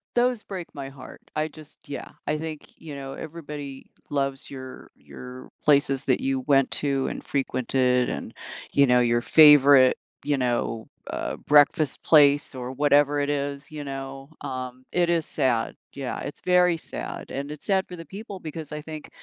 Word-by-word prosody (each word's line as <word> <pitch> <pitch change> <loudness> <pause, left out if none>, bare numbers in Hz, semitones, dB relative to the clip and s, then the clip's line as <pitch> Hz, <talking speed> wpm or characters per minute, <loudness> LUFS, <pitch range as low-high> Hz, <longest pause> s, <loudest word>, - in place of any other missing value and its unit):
Those 245 -2 +2
break 185 -4 -7
my 140 -2 -6
heart. 135 -1 -12
I 155 0 0
just 155 -2 -14
Yeah. 140 - -6 0.2
I 155 - 0
think, 155 -1 -8
you 155 -3 -8
know, 135 -1 -6
everybody 145 -3 -8 0.2
loves 140 -2 -2
your 130 -1 -9
your 125 +1 -11
places 140 -2 +3
that 130 - +2
you 135 0 0
went 135 0 +3
to 140 -2 0
and - - -4
frequented 130 -2 +1
and, - - -5 0.4
you 140 -1 +4
know, 125 0 +5
your 120 0 +3
favorite, 140 0 +7 0.3
you 145 -1 +1
know, 120 -3 -1 0.2
uh, - - -3
breakfast 145 0 +3
place 145 -2 +5
or 125 0 -5
whatever 145 +1 +3
it 145 0 0
is, 140 0 -3
you 150 -1 -6
know, 135 0 -7
um, 130 -2 -6
it 175 -1 +3
is 170 -2 +1
sad, 125 -6 0 0.2
yeah, 135 -2 -4
it's 145 - -7
very 180 -1 +4
sad, - - -7
and 140 +2 -5
it's 150 - -9
sad 190 -1 +2
for 180 - -8
the 165 - -9
people, 200 +2 -8
because 155 -2 -7
I 150 - -4
think, 155 0 -8
140 Hz, 170 wpm, -25 LUFS, 135-155 Hz, 0.4 s, favorite